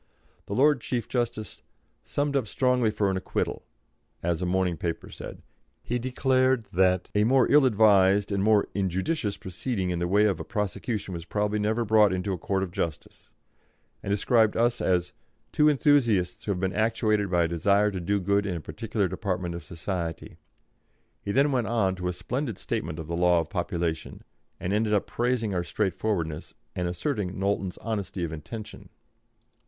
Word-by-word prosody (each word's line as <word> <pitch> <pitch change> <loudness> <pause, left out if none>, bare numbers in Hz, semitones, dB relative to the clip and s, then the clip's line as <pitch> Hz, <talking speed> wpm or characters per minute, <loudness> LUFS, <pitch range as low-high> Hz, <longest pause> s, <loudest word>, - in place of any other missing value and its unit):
The 100 - -3
Lord 145 0 +4
Chief 120 -2 -2
Justice 120 -3 -3 0.4
"summed 145 0 -1
up 130 -5 +1
strongly 125 -1 +2
for 105 -2 0
an 95 - -1
acquittal," 95 - -2 0.6
as 85 0 0
a 90 - 0
morning 90 -1 +1
paper 85 +1 -4
said; - - -9 0.4
he 120 +1 -2
declared 130 -1 +1
that 90 0 +2
"a 105 - +3
more 130 +3 +4
ill 145 -2 +6
advised 100 -3 +4
and 100 -1 0
more 105 -1 +4
injudicious 100 - -1
proceeding 95 0 -3
in 85 - -2
the 85 - 0
way 100 +4 +4
of 100 -5 +1
a - - -4
prosecution 105 0 -3
was 85 -1 -6
probably 105 +2 -1
never 110 +3 0
brought 105 -2 +5
into 95 +1 -1
a - - -3
court 95 +2 -1
of 90 - -5
justice," 85 -4 -5 0.7
and - - -6
described 110 +2 +3
us 120 +1 +2
as 90 -1 +1 0.4
"two 150 0 +4
enthusiasts 125 - +2
who 105 - 0
have 90 - -2
been 95 0 -1
actuated 110 -2 +1
by 90 -1 +3
a - - +1
desire 100 +5 +2
to 95 - -4
do 100 +4 0
good 100 +2 +1
in 90 - -2
a - - -3
particular 110 +3 -2
department 90 -2 -3
of 85 -2 -6
society." 85 +1 -5 0.8
He 100 - -3
then 140 +5 +3
went 125 -5 0
on 105 -5 +1
to 90 0 -3
a 90 - -1
splendid 125 +4 -3
statement 80 -1 -3
of 80 - -5
the 85 +2 -4
law 90 0 +4
of 80 0 -4
population, 85 -4 -3 0.4
and 90 - -2
ended 105 0 +1
by - - +5
praising 120 0 -1
our 90 -1 0
straightforwardness 95 -5 -2 0.2
and 90 -1 -1
asserting 90 - -2
Knowlton's 95 -1 -1
honesty 100 -5 -3
of 80 -2 -3
intention. 105 +8 -8
100 Hz, 180 wpm, -27 LUFS, 90-115 Hz, 0.8 s, ill